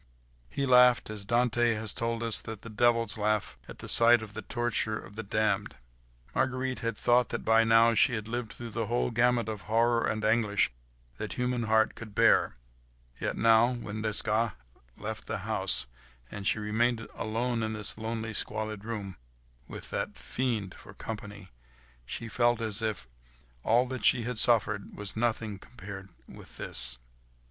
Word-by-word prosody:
He 140 - -2
laughed, 125 -3 +5
as 105 -2 -7
Dante 120 +1 +2
has 110 -1 -3
told 115 0 -2
us 115 -2 +3
that 110 -2 -8
the 115 - -8
devils 115 0 +2
laugh 105 0 0
at - - -9
sight 115 0 +6
of 105 -2 -10
the 110 - -5
torture 120 -2 -1
of 105 - -11
the 110 - -4
damned. 105 - -1 0.6
Marguerite 130 0 -1
had 115 -3 -3
thought 120 0 +3
that - - -4
by 115 0 +5
now 115 +1 +5
she 120 +2 +3
had 110 -1 -5
lived 120 -1 -4
through 120 -1 -8
the 115 0 -2
whole 120 +1 0
gamut 120 0 +2
of 110 -2 -4
horror 115 +1 +3
and 110 0 -2
anguish 110 - +2 0.5
that - - -5
human 125 -1 -1
heart 110 0 +3
could 110 -3 -10
bear; - - +4 0.6
yet - - -2
now, 115 +2 +5
when 110 -2 -6
Desgas 110 +1 0 0.4
left - - -6
the - - -2
house, 65 0 +1 0.5
and 100 -1 -5
she - - +2
remained 115 +2 0
alone 115 +2 -2
in 110 0 -2
this 105 -1 -1
lonely, 110 0 -4
squalid 110 -1 -1
room, 105 -4 -5 0.5
with - - -8
that - - -3
fiend 115 -7 -2
for - - -14
company, 105 -3 -7 0.6
she 115 - -5
felt 120 +1 +2
as 110 -2 -2
if 110 -10 -3 0.5
all 120 - +3
that 130 -2 -6
she 120 - +3
had 125 -1 -3
suffered 105 -3 +2
was 105 -1 -5
nothing 110 -3 -1
compared 95 -3 -10 0.2
with - - -12
this. 60 -1 -2
110 Hz, 165 wpm, -29 LUFS, 105-120 Hz, 0.6 s, sight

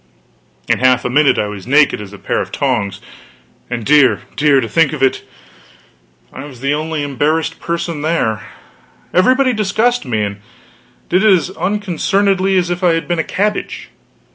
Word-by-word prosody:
In - - +1
half 130 0 +3
a 125 - -1
minute 145 +1 +3
I - - +1
was 105 -2 -7
as - - -15
naked 140 -4 +3
as 100 -2 -9
a 100 - -11
pair - - -2
of - - -6
tongs! 105 -8 -2 0.7
And 120 -3 -4
dear, 145 -2 +4
dear, 145 -2 +3
to 115 - -2
think 165 +3 +2
of 140 -3 -3
it: 135 - +2 1.1
I 135 - -8
was 135 -5 -12
the 140 +3 0
only 155 0 -3
embarrassed 150 +3 -1
person 170 -2 -3
there. 125 -9 0 0.7
Everybody 255 +7 +3
discussed 220 +3 0
me; 110 -6 -1
and 100 0 -5 0.7
did 185 +4 +1
it 215 - +5
as 185 -1 +2
unconcernedly 195 0 0
as 175 -1 0
if 175 +1 -3
I 175 -2 +4
had 165 - -3
been 175 -1 -1
a - - +1
cabbage. 210 +2 -3
150 Hz, 175 wpm, -16 LUFS, 130-185 Hz, 1.1 s, it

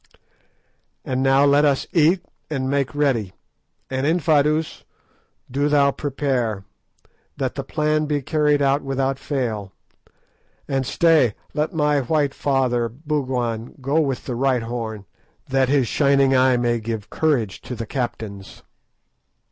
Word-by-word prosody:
And 130 0 -1
now 135 +1 +4
let 145 +1 +4
us 140 -2 +2
eat 170 +2 +3 0.2
and 135 -4 -2
make 140 0 -1
ready; 125 -10 0 0.5
and, 130 +1 -1
Infadoos, 155 -2 +1 0.7
do 140 +3 +1
thou 140 -1 +4
prepare, 130 -8 -2 0.7
that - - -2
the - - -4
plan 155 0 0
be 145 -2 -1
carried 150 0 +2
out 140 +1 +2
without 135 0 -1
fail; 110 -10 -3 0.9
and 135 -2 -1
stay, 155 - +3 0.2
let 150 +2 -1
my 150 -2 +2
white 145 +1 0
father 125 -4 0
Bougwan 125 -4 -3
go 140 +4 +1
with 135 -5 -2
the 125 - -3
right 125 -1 +1
horn, 115 -3 -5 0.4
that 130 -1 +1
his 135 -3 +2
shining 140 -1 +3
eye 130 -1 +4
may 120 -1 +1
give 110 -1 -5
courage 125 -11 0
to 125 - -6
the 115 0 -5
captains." 110 -6 -5
135 Hz, 130 wpm, -22 LUFS, 120-145 Hz, 0.9 s, now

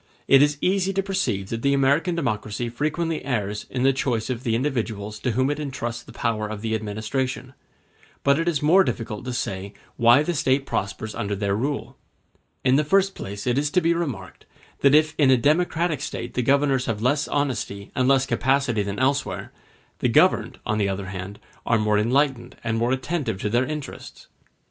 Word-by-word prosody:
It 135 0 +7
is 145 0 +3
easy 190 +1 +1
to 195 +1 0
perceive 115 - -1
that 115 0 -3
the 140 +1 +2
American 145 +6 +2
democracy 120 - -2
frequently 155 +6 -2
errs 105 -6 -2
in 125 -1 -2
the 135 0 +4
choice 125 -3 -1
of 120 -2 -3
the 115 -3 +1
individuals 110 -5 -2
to 125 - -1
whom 130 +4 +1
it 145 - -3
entrusts 120 -5 -4
the - - -14
power 110 -2 -1
of 105 -1 -6
the 110 0 -2
administration; 110 +5 -3 0.7
but 140 +2 +3
it 165 - -1
is 155 -4 0
more 180 +6 +6
difficult 110 - -4
to 125 - -3
say 100 -4 -4 0.2
why 120 +4 +6
the 175 - -1
State 135 -2 +1
prospers 100 +1 -3
under 100 0 -2
their 100 0 -1
rule. 140 +6 -3 0.7
In 130 +1 +4
the 150 - +3
first 195 +5 +2
place 100 +1 -7
it 125 +2 +2
is 145 0 0
to 180 - +3
be 170 -1 +2
remarked, 140 - -5 0.3
that 140 +1 +5
if 155 0 +4
in 140 -3 +5
a 130 - +6
democratic 155 +2 +1
State 120 -4 -5
the 125 - 0
governors 135 0 +2
have 110 -2 -2
less 145 +4 +2
honesty 125 -8 -2
and 130 0 +1
less 135 -1 +4
capacity 135 -5 +1
than 100 0 -3
elsewhere, 135 +2 -1 0.5
the - - +1
governed, - - +3
on 110 0 0
the 100 -1 +1
other 95 0 -4
hand, 95 +2 -6 0.3
are 120 - +2
more 105 -1 +2
enlightened 130 +2 +1
and 115 -1 -1
more 120 +2 +1
attentive 130 - -2
to 105 - -1
their 120 +3 +2
interests. 150 -1 -7
130 Hz, 195 wpm, -24 LUFS, 110-145 Hz, 0.7 s, It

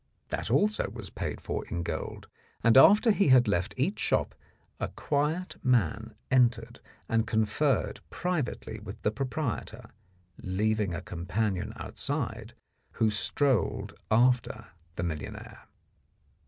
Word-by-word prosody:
That - - -3
also 210 +1 +2
was - - -9
paid - - -4
for - - -3
in 85 0 -3
gold, 80 -2 -5 0.4
and 115 - +5
after 210 - +7
he 200 -3 +2
had 130 -3 +6
left 100 +2 0
each 170 +11 0
shop - - +1 0.5
a - - -1
quiet 150 +5 -2
man 110 - +1 0.2
entered 120 -2 +2 0.3
and 115 -1 +1
conferred 110 +7 +1
privately 155 -10 -3
with 105 -2 -9
the 105 - +2
proprietor, 125 -3 -4 0.5
leaving 105 0 0
a 80 - -5
companion 90 +2 -2
outside, - - -4 0.4
who 110 -1 +2
strolled 125 - +1 0.2
after 115 -1 +2 0.3
the - - -3
millionaire. 80 -4 -6
115 Hz, 120 wpm, -29 LUFS, 105-135 Hz, 0.5 s, after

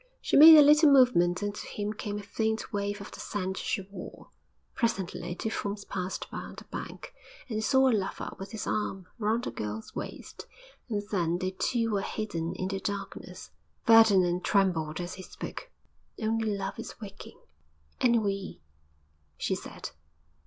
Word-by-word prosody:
She - - -1
made 315 +2 +11
a 300 - +10
little 300 +1 +7
movement 210 -10 +4
and 205 0 -1
to - - -8
him 210 0 -3
came 210 -1 -4
a 210 - -6
faint 220 +1 -2
wave 205 0 -2
of 205 - -9
the - - -10
scent 190 -2 -3
she 200 - -1
wore. 190 -1 -11 0.4
Presently 180 -6 -2
two 220 - -3
forms 205 -1 -4
passed 185 -1 -4
by - - -4
on - - -9
the - - -10
bank - - -8 0.3
and 225 -4 -3
they - - -1
saw 265 +3 +4
a 255 - +4
lover 195 -3 -2
with 195 0 -7
his 220 - -5
arm 195 -3 -2
round 225 +3 0
a - - -3
girl's 105 +1 -5
waist, - - -7 0.4
and 205 -2 -1
then 175 -4 +1
they 185 +1 -2
too 225 +4 0
were 200 -2 +1
hidden 175 -5 -3
in 185 +1 -3
the 195 0 -2
darkness. 200 0 -6 0.3
Ferdinand 195 -6 +6
trembled 175 -6 +1
as 175 +1 -4
he 185 - -8
spoke. - - -8 0.5
'Only 220 -1 0
Love 195 0 -4
is - - -8
waking!' 200 -3 -10 0.6
'And 235 -2 +3
we!' 195 -1 -3 0.8
she - - -1
said. - - -6
205 Hz, 175 wpm, -29 LUFS, 185-220 Hz, 0.8 s, made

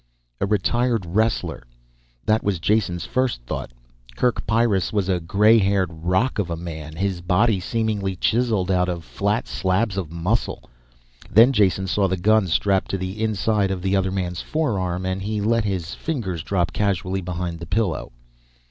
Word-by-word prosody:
A - - 0
retired 115 +1 +1
wrestler. 110 +6 0 0.6
That 110 +1 +3
was 100 -3 0
Jason's 90 -2 0
first 130 - 0
thought. - - -5 0.5
Kerk 125 - 0
Pyrrus 110 -4 +2
was 100 -3 0
a 90 -2 +2
gray 105 +7 +4
haired 95 -3 +1
rock 90 +10 0
of 95 -4 -1
a 85 - -3
man. 80 -2 -7
His 95 0 -2
body 95 +4 +2
seemingly 105 -1 -1
chiseled 110 -2 +1
out 90 -1 +2
of 85 -2 -4
flat 105 +3 -1
slabs 95 +2 0
of 85 -5 -3
muscle. 90 +8 -1 0.7
Then 115 +7 +6
Jason 95 -4 +2
saw 95 +1 +1
the 95 0 -1
gun 105 +2 +3
strapped 95 +3 +1
to 95 - -1
the 95 +3 -5
inside 105 -1 +1
of 95 -2 -3
the 95 0 +1
other 95 -1 +1
man's 90 -2 -3
forearm, 95 - -1
and 95 +1 -2
he 105 +2 -2
let 110 +2 +1
his 95 -5 -2
fingers 105 - -3
drop 90 0 -1
casually 95 -2 -1
behind 90 -1 -4
the 85 - -8
pillow. 90 - -1
95 Hz, 165 wpm, -23 LUFS, 90-110 Hz, 0.7 s, Then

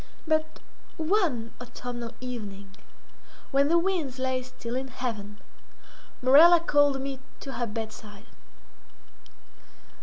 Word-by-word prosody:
But 315 -1 0 0.4
one 315 - +1
autumnal 240 -1 -6
evening, 200 -6 -7 0.8
when 280 0 +4
the 335 +3 +4
winds 335 -7 0
lay 260 0 0
still 250 -2 -7
in 265 +1 -2
heaven, 220 -5 -5 0.9
Morella 320 +7 +8
called 290 -4 +3
me 270 0 -4 0.2
to 270 - -6
her 240 -1 -2
bedside. 215 -2 -7
260 Hz, 100 wpm, -27 LUFS, 230-300 Hz, 0.9 s, Morella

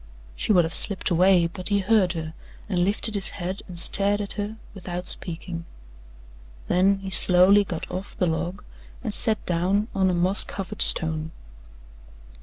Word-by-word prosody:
She - - -2
would 180 -4 +4
have 165 - -6
slipped 200 -2 +2
away, 180 0 +3
but 180 +3 -5
he 200 - +1
heard 195 -2 +1
her 160 -2 -6 0.3
and 185 -4 -2
lifted 210 +3 +1
his 200 -2 0
head 185 +1 -5
and 180 -2 -10
stared 200 +3 +1
at 205 -1 -5
her 210 +1 -6 0.2
without 180 -2 -7
speaking. 170 -1 -5 1.0
Then 195 +2 +2
he 190 - -6
slowly 190 +3 +7
got 175 -4 -6
off 190 +2 -7
the 180 - 0
log 170 +4 -4 0.4
and 220 -4 -4
sat 220 0 -2
down 190 +5 -1
on 190 -1 +1
a 180 - -1
moss 180 +3 +5
covered 200 +1 -6
stone. 160 -1 +1
185 Hz, 165 wpm, -23 LUFS, 175-200 Hz, 1.0 s, slowly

